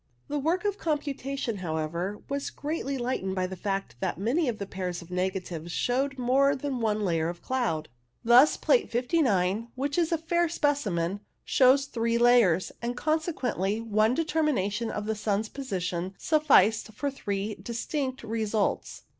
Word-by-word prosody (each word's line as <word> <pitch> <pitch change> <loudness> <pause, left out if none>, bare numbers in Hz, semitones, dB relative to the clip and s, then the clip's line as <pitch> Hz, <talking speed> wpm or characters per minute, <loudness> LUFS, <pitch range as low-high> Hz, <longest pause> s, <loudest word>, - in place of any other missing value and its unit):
The 295 0 -1
work 335 +8 0
of 410 0 -1
computation, 275 -6 -2
however, 170 +3 -3
was 280 0 -2
greatly 290 -2 -3
lightened 240 -7 -2
by 185 -1 0
the 190 +1 -5
fact 195 - -3
that - - -2
many 255 - +1
of 225 - -3
the 200 - -4
pairs 185 -2 -4
of 170 - -16
negatives 180 -2 -3
showed 270 +7 0
more 270 +3 +3
than 270 -1 -3
one 215 -2 0
layer 165 -2 +1
of 175 0 -8
cloud; 230 -13 -1 0.4
thus 245 +6 +6
Plate 480 -5 +2
59, 230 - +1
which 280 +5 -1
is 335 -1 +1
a 330 - +2
fair 340 +1 +1
specimen, 205 - 0 0.3
shows 270 +1 +5
three 230 -3 0
layers, 235 -8 +4
and, 240 +1 -3
consequently, 260 - -1
one 220 +1 +2
determination 265 - 0
of 210 - -4
the 220 - 0
sun's 210 0 -1
position 185 -8 -3
sufficed 225 - +3
for 280 +6 -2
three 205 -5 -3
distinct 260 +2 -3
results. 220 -2 -1
230 Hz, 155 wpm, -28 LUFS, 195-280 Hz, 0.4 s, thus